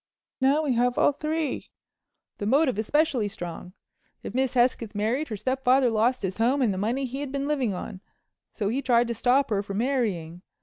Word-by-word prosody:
Now 280 +4 +3
we 280 -4 +1
have 245 +1 +1
all - - +4
three—the 305 0 -3 0.8
motive 265 -2 +2
especially 275 -1 +1
strong. 175 -1 -7 0.5
If - - -6
Miss 260 0 0
Hesketh 240 -3 +1
married, 235 +9 0
her 215 - -5
stepfather 255 +2 +2
lost 230 +3 +1
his 190 -1 -3
home 255 +4 +2
and 215 -5 +2
the - - -4
money 240 +7 -1
he 260 +2 -5
had 285 -2 -4
been 280 0 -2
living 260 -9 0
on, 185 +1 -7 0.5
so 205 -3 -2
he 255 +5 -1
tried 240 -2 +3
to - - 0
stop 250 +4 +2
her 200 -2 +1
from 200 -1 -6
marrying. 205 -10 -1
245 Hz, 185 wpm, -26 LUFS, 215-275 Hz, 0.8 s, all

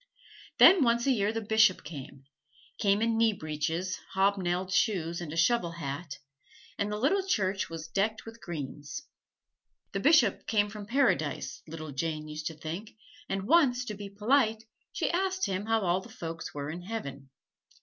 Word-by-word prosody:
Then 370 -6 +8
once 235 -1 +2
a 275 - +4
year 210 -4 +1
the 225 0 -3
Bishop 220 -2 +4
came 140 -3 -9 0.6
came 200 +1 +3
in 225 -1 +1
knee 225 -1 +4
breeches, 160 +2 -3 0.2
hobnailed 190 -2 +1
shoes, 175 -5 +1
and 165 -1 -5
shovel 170 -1 +2
hat, 145 -1 -5 0.6
and 205 +1 0
the 210 - -2
little 295 - +2
church 200 - 0
was 165 -1 -6
decked 215 +5 -1
with 225 +1 -11
greens. 150 - -6 0.9
The 195 - -2
Bishop 270 - +4
came 205 -2 +2
from 210 -1 -8
Paradise, 235 - 0
little 155 -1 -7
Jane 155 +2 -3
used 155 0 -5
to 160 - -5
think, 170 +8 -7 0.3
and 195 0 -1
once, 260 -5 +4
to 215 - -4
be 200 0 -7
polite, 220 +2 +2 0.3
she - - -1
asked 375 +2 0
him 200 +1 -3
how 225 0 +2
all 180 0 +1
the - - -13
folks 165 -1 -6
were 145 0 -5
in 175 +2 -6
Heaven. 140 -10 -6
195 Hz, 165 wpm, -29 LUFS, 165-225 Hz, 0.9 s, Then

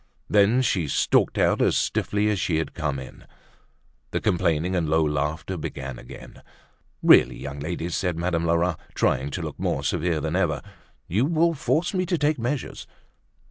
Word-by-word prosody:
Then 105 +5 +4
she 90 -10 0
stalked - - +2
out - - +2
as - - +3
stiffly 105 +1 0
as 100 - -1
she 80 - 0
had 80 - -3
come 75 -4 -2
in. 65 -1 -11 0.8
The - - -1
complaining 85 +1 +1
and 80 -4 0
low 80 +1 +3
laughter 75 +5 -2
began 70 -4 -6
again. - - -12 0.6
"Really, - - +6
young 70 +1 -7
ladies!" 85 +3 -3
said 90 -3 -1
Madame 85 -1 -1
Lerat, 85 0 +1 0.2
trying 65 +2 +1
to - - -4
look - - -6
more - - -1
severe 85 -1 0
than 80 +2 -2
ever. 80 -8 0 0.4
"You 105 +9 +1
will 165 +2 +2
force 160 +4 0
me 185 -1 0
to 175 -1 +1
take 150 -2 +1
measures." 125 +4 -3
85 Hz, 170 wpm, -24 LUFS, 75-105 Hz, 0.8 s, Really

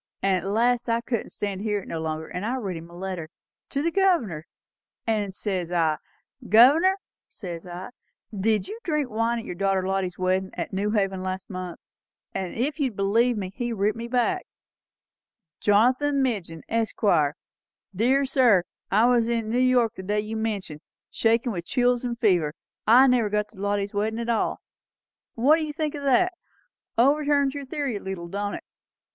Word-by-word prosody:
And 195 -1 +3
at 185 +1 -2
last 240 +2 +2
I 230 0 +2
couldn't 235 -2 -3
stand 200 -2 -4
it 210 -2 -2
no 165 - -4
longer; 160 0 -3
and 180 - -5
I 235 +4 -1
writ 200 -8 -3
him 165 +1 -9
a 170 - -13
letter 180 -4 -5 0.4
to 280 +1 -1
the 335 - +1
Governor; 295 - +1 0.6
and 210 -4 -1
says 185 -5 -3
I, 160 -3 +1 0.5
'Governor,' 290 - +6 0.3
says 175 -3 -8
I, 180 +4 -7 0.4
'did 210 +1 +1
you 430 +3 -7
drink 300 -7 -1
wine 230 +2 0
at 230 - -5
your - - -5
daughter 190 0 0
Lottie's 190 -2 -1
weddin' 185 +1 0
at - - -4
New 200 +2 0
Haven 195 -3 0
last 185 +1 -5
month?' 185 -2 -6 0.5
And 185 -2 -4
if 285 +7 -1
you'll 260 -7 0
believe 225 +5 +2
me, 190 -2 -4
he 240 0 -3
writ 210 -1 0
me 230 +1 -5
back, 255 +10 0 1.1
'Jonathan 255 +7 +3
Midgin, 185 -10 -3
Esq. 225 -1 -2 0.9
Dear 260 +7 +3
sir, 245 -9 +4 0.3
I 215 +4 +4
was 240 -2 +3
in 230 -2 -1
New 240 +3 +1
York 250 -3 +3
the 190 - -8
day 205 +2 0
you 215 +1 -5
mention, 205 -9 -3 0.3
shakin' 230 +2 +2
with 175 -4 -5
chills 245 +2 +1
and 240 -1 -3
fever, 175 -9 +2 0.3
and 250 +4 +7
never 235 -4 +2
got 210 0 -1
to - - -17
Lottie's 200 0 -1
weddin' 215 +2 -1
at 235 0 -3
all.' 230 - 0 0.7
What 275 +7 +5
do 325 - -2
you 300 -1 -4
think 305 -1 -2
o' 290 - -6
that? 360 +7 +3 0.6
Overturns 285 +2 +3
your 285 -2 -6
theory 275 -5 -2
a - - -6
leetle, 185 -3 -6
don't 205 +2 -3
it? - - -8
220 Hz, 180 wpm, -25 LUFS, 190-250 Hz, 1.1 s, and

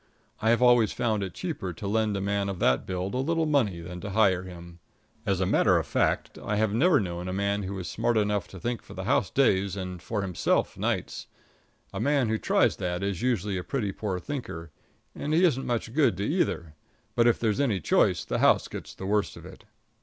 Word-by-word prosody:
I 110 - +2
have 120 +2 +3
always 120 -3 +5
found 110 -4 0
it 95 -2 -5
cheaper 150 - -4
to 100 - -6
lend 105 0 +1
a - - -2
man 100 0 -1
of 95 - -4
that 65 -6 +1
build 95 +1 -3
a - - -1
little 165 +4 +1
money 120 - +1
than 90 +1 -8
to 100 - -5
hire 95 -3 +3
him. 85 -2 -11 0.5
As 95 -2 +1
a 95 - +1
matter - - +3
of - - -1
fact, - - 0
I 105 - -2
have 105 -1 +1
never 145 +6 +4
known 90 -3 -4
a - - -2
fellow 100 +1 0
who 100 - -4
was 95 -2 -5
smart 120 -1 0
enough 105 -1 0
to 95 - -11
think 120 +4 -3
for - - -13
the - - -5
house - - +1
days 95 0 +2
and 90 -2 -6
for 105 -1 -3
himself 90 -3 0
nights. - - -3 0.7
A - - -4
man 140 -5 +2
who 110 0 0
tries - - +2
that 90 +1 -2
is 100 -3 -2
usually 105 -6 0
a - - -5
pretty 110 -5 -2
poor 95 -2 -3
thinker, 85 - -6 0.4
and 150 +2 -2
he 175 - +4
isn't 135 -7 +2
much 115 -1 -2
good 140 - +3
to 100 - -2
either; 100 - -1 0.4
but 120 0 +3
if 120 - +3
there's 110 -3 0
any 120 -9 +1
choice 80 - +2
the - - -2
house - - +4
gets - - -8
the 95 - -7
worst 105 +1 0
of - - -12
it. - - -13
100 Hz, 225 wpm, -27 LUFS, 95-120 Hz, 0.7 s, always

